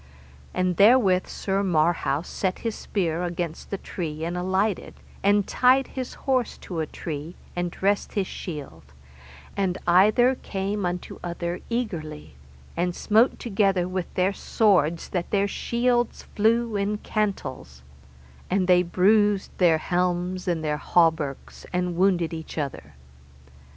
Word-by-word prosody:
And 185 -1 0
therewith 200 -4 +5
Sir 195 0 -2
Marhaus 165 -4 +1
set 185 -2 -2
his 225 - 0
spear 170 -6 -2
against 170 -2 -4
a 200 - -1
tree 160 -5 -5
and 170 +1 -3
alighted 190 +3 -1 0.3
and 200 0 +3
tied 255 +1 +3
his 255 -1 -5
horse 255 -3 +1
to 175 -3 -6
a 160 - -1
tree, 155 +2 -6 0.2
and 175 0 -1
dressed 200 +3 -1
his 200 -2 0
shield, 145 - -7 0.7
and 190 -2 0
either 210 +8 +5
came 200 -4 -3
unto 175 0 -5
other 175 0 -3
eagerly, 170 - -4 0.4
and 175 +1 -1
smote 225 +4 +3
together 195 -5 +1
with 185 -1 -4
their 185 +2 +2
swords 175 -8 +2
that 175 -2 -2
their 200 -1 +2
shields 240 +3 0
flew 225 +1 +2
in 205 +1 0
cantels, 190 - -3 0.7
and 185 0 +1
they 180 -1 +6
bruised 200 +3 +2
their 170 -3 +5
helms 180 +2 -1
and 170 -3 0
their 150 -1 0
hauberks, 160 -5 0
and 180 -1 -1
wounded 175 -2 +2
either 160 0 -6
other. 135 - -5
185 Hz, 135 wpm, -25 LUFS, 170-205 Hz, 0.7 s, they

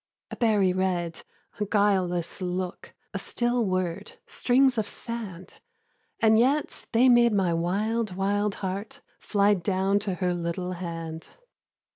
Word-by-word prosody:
A - - -4
berry 210 -6 +3
red, 180 -3 -1 0.4
a 210 - 0
guileless 190 -4 +1
look, 180 0 -4 0.2
A - - -2
still 240 0 0
word, 185 -1 -2
strings 255 -1 +2
of 210 - -2
sand! 210 -7 -7 0.6
And 220 -1 +5
yet 275 +5 0
they 245 +3 +5
made 240 -2 +5
my 190 -4 +2
wild, 205 +5 -1
wild 200 +1 0
heart 205 +9 -5 0.2
Fly 205 0 +2
down 195 +1 +1
to 200 -3 -2
her 180 0 0
little 175 +1 -3
hand. 165 -2 -6
195 Hz, 130 wpm, -26 LUFS, 180-220 Hz, 0.6 s, And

